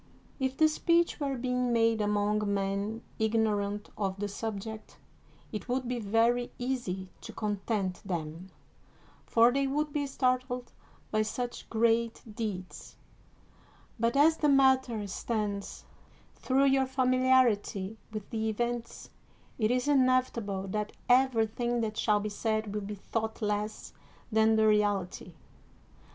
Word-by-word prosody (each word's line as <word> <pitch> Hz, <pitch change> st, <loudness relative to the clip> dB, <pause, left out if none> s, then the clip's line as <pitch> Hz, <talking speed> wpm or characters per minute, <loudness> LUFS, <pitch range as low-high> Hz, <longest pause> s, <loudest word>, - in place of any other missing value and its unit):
If 265 Hz, 0 st, -1 dB
the 315 Hz, -, +6 dB
speech 335 Hz, +2 st, +2 dB
were 275 Hz, -2 st, -1 dB
being 250 Hz, 0 st, 0 dB
made 230 Hz, -1 st, +3 dB
among 210 Hz, 0 st, +1 dB
men 200 Hz, +3 st, -2 dB, 0.2 s
ignorant 210 Hz, -2 st, 0 dB
of 195 Hz, -2 st, -2 dB
the 205 Hz, -, -1 dB
subject, 215 Hz, +1 st, -6 dB, 0.5 s
it 215 Hz, +3 st, -6 dB
would 250 Hz, 0 st, -1 dB
be 245 Hz, 0 st, -2 dB
very 230 Hz, +3 st, +2 dB
easy 240 Hz, -8 st, -3 dB
to -, -, -8 dB
content 205 Hz, -2 st, -2 dB
them, 170 Hz, -1 st, -5 dB, 0.8 s
for 230 Hz, +1 st, +5 dB
they 275 Hz, +1 st, +1 dB
would 295 Hz, +2 st, -1 dB
be 285 Hz, -1 st, -1 dB
startled 255 Hz, -2 st, -1 dB, 0.4 s
by 215 Hz, -, +2 dB
such 240 Hz, +3 st, -4 dB
great 230 Hz, 0 st, +1 dB
deeds; 205 Hz, -5 st, -6 dB, 1.0 s
but 230 Hz, +3 st, +1 dB
as 315 Hz, +3 st, +5 dB
the 300 Hz, -, +2 dB
matter 260 Hz, -5 st, +3 dB
stands, 205 Hz, 0 st, -3 dB, 0.5 s
through 270 Hz, +1 st, +1 dB
your 270 Hz, -1 st, +3 dB
familiarity 255 Hz, -6 st, +2 dB
with 215 Hz, -2 st, -6 dB
the 220 Hz, -1 st, -1 dB
events, 235 Hz, +2 st, -3 dB, 0.5 s
it 215 Hz, -1 st, +2 dB
is 250 Hz, +2 st, +1 dB
inevitable 255 Hz, -8 st, +2 dB
that 210 Hz, +1 st, -3 dB, 0.2 s
everything 240 Hz, -2 st, +2 dB
that 215 Hz, -1 st, -2 dB
shall 210 Hz, -1 st, +2 dB
be 210 Hz, -, -3 dB
said 215 Hz, 0 st, -2 dB
will 210 Hz, -, -2 dB
be 205 Hz, +1 st, -5 dB
thought 220 Hz, +2 st, -3 dB
less 210 Hz, 0 st, -3 dB, 0.4 s
than 220 Hz, 0 st, +4 dB
the 220 Hz, 0 st, +4 dB
reality. 205 Hz, -5 st, 0 dB
225 Hz, 130 wpm, -30 LUFS, 205-255 Hz, 1.0 s, the